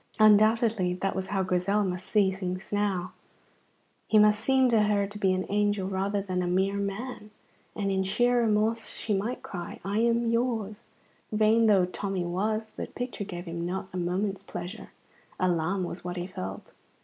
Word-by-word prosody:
Undoubtedly 215 -3 +4
that 195 +2 -2
was 190 0 -2
how 195 0 0
Grizel 185 +3 +1
must 180 -1 -3
see 200 -3 +3
things 185 0 -5
now; 195 -3 0 0.9
he 220 - +4
must 210 0 +5
seem 265 +3 +3
to 230 -3 +4
her 205 -1 +2
to 205 +1 -8
be 190 -2 +3
an 185 0 0
angel 205 -1 +1
rather 195 +1 -1
than 185 -2 -2
a 180 - -1
mere 190 +3 +1
man; 210 +3 -4 0.5
and 200 -2 -1
in 190 0 +1
sheer 240 +6 +2
remorse 220 0 +1
she 215 - -3
might 210 +6 -2
cry, 175 -3 -7
"I 200 +2 0
am 235 +1 +2
yours!" 230 -3 -1 0.5
Vain 220 +1 +4
though 195 -4 +5
Tommy 185 0 -3
was, 215 +5 -1
the - - -6
picture 245 -4 -5
gave 175 -2 -7
him 170 0 -4
not 190 +2 -3
a - - -3
moment's 190 +3 -1
pleasure. 200 +2 -7 0.5
Alarm 180 +1 +1
was 175 0 -5
what 180 0 -5
he 175 - -3
felt. 95 - -7
200 Hz, 175 wpm, -28 LUFS, 185-215 Hz, 0.9 s, must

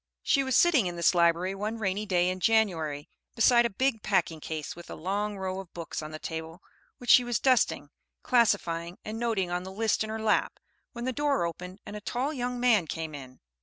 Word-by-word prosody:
_] - - -64 0.2
She 275 - +3
was 265 -1 0
sitting 300 - +4
in 175 - -4
this 170 +1 +3
library 170 +2 +2
one 210 +3 -3
rainy 205 0 -2
day 180 -2 +2
in 185 0 -3
January, 170 -9 +1 0.3
beside 235 +1 +5
a - - -10
big 240 +1 0
packing 175 -6 0
case, 155 -1 -5
with 175 - -12
a - - -6
long 200 +5 -2
row 190 0 -3
of 190 -3 -11
books 170 -2 -5
on 155 - -7
the 155 - -7
table, 160 +2 -7 0.3
which 245 - +1
she 250 - +8
was 240 -2 0
dusting, 255 -3 +2 0.3
classifying, 180 -8 +1
and 220 +1 -5
noting 215 -7 -1
on 175 0 -1
the 190 +1 -8
list 220 +2 0
in 215 - -6
her 220 - -3
lap, 220 -1 +1 0.3
when 235 0 -5
the 260 - -1
door 285 -7 +1
opened 180 +3 -7
and 210 - -8
a 210 - -6
tall 255 +7 -2
young 250 -2 -3
man 225 -9 +3
came 160 0 -5
in. 130 -3 -10
195 Hz, 220 wpm, -28 LUFS, 170-235 Hz, 0.3 s, she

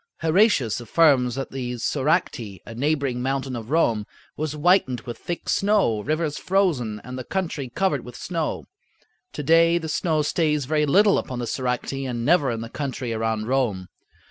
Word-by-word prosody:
Heratius 160 - +3
affirms 125 -1 +3
that 135 0 -4
the 125 -2 -4
Soracte, 125 - -1
a 115 - -8
neighboring 140 -1 -1
mountain 135 0 -2
of 115 -1 -7
Rome, 115 -9 +1 0.3
was 155 -1 -3
whitened 150 - +2
with 120 -1 -7
thick 175 - -5
snow, 195 - +2
rivers 155 +4 -1
frozen, 155 - 0
and 125 +1 -7
the - - -5
country 160 -6 -3
covered 145 -1 0
with 125 - -10
snow. 165 -4 -3 0.7
To 150 - -4
day 165 +3 +5
the 160 -2 -4
snow 155 +1 0
stays 150 -2 +1
very 150 +1 +1
little 200 +7 +5
upon 125 - -5
the 120 - -3
Soracte 125 +1 -2 0.2
and 120 -1 -3
never 150 -4 +4
in 115 -1 -3
the 115 - -5
country 130 -4 -4
around 110 -1 -1
Rome. 120 -9 0
135 Hz, 170 wpm, -24 LUFS, 120-160 Hz, 0.7 s, day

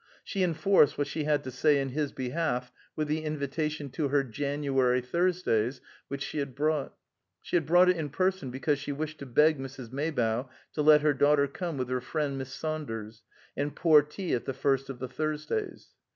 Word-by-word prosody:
She 195 - -3
enforced 170 -2 +3
what 145 - +1
she 150 +2 -3
had 150 -1 +1
to 130 - -6
say 145 +3 +3
in 135 -1 -1
his 145 +2 -2
behalf 125 -2 -2 0.2
with 155 -1 -1
the 155 +1 -1
invitation 150 -1 -3
to 150 +1 -1
her 140 0 +2
January 135 0 0
Thursdays 130 -5 0 0.3
which 140 0 -4
she 150 - -4
had 140 -3 -4
brought. 150 0 0 0.5
She - - -3
had 165 -4 +2
brought 175 +3 +6
it 180 -1 +4
in 155 -3 -3
person 185 0 0
because 135 +3 0
she 140 +1 -4
wished 155 +2 -4
to 140 - -7
beg 150 +4 +4
Mrs. 135 -3 -8
Maybough 130 -4 -1 0.2
to 150 - -1
let 150 0 +7
her 150 -1 +3
daughter 145 +1 +4
come 170 +2 -4
with 130 -1 -2
her 130 0 -1
friend, 145 0 -2
Miss 130 -1 -6
Saunders, 115 -9 -5 0.3
and 145 +1 -2
pour 155 -3 +6
tea 160 +6 -4
at 120 - -1
the 135 - -3
first 135 0 0
of 135 - -5
the 130 - -5
Thursdays. 155 - -3
145 Hz, 195 wpm, -29 LUFS, 130-155 Hz, 0.5 s, let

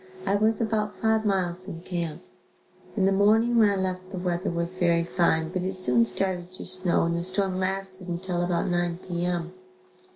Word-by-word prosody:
I 195 - +1
was 215 +1 +2
about 215 -2 -1
five 220 -1 +1
miles 185 -2 -1
from 170 -4 -8
camp. 170 -3 -4 0.7
In 190 - +3
the 195 - +3
morning 220 +4 +3
when 215 -2 +6
I 200 - +1
left 185 -1 -3
the 190 - -5
weather 180 +1 -2
was 170 +1 -2
very 170 -2 +2
fine 165 -2 +1
but 185 +1 -3
it 185 +1 -2
soon 125 -11 +3
started 180 +8 -1
to - - -8
snow 185 -1 +2
and 170 0 0
the 170 - -1
storm 185 +1 0
lasted 190 0 0
until 175 0 -3
about 175 -1 0
9 175 -1 0
P. 175 -1 -2
M. 175 0 -2
185 Hz, 195 wpm, -26 LUFS, 175-195 Hz, 0.7 s, when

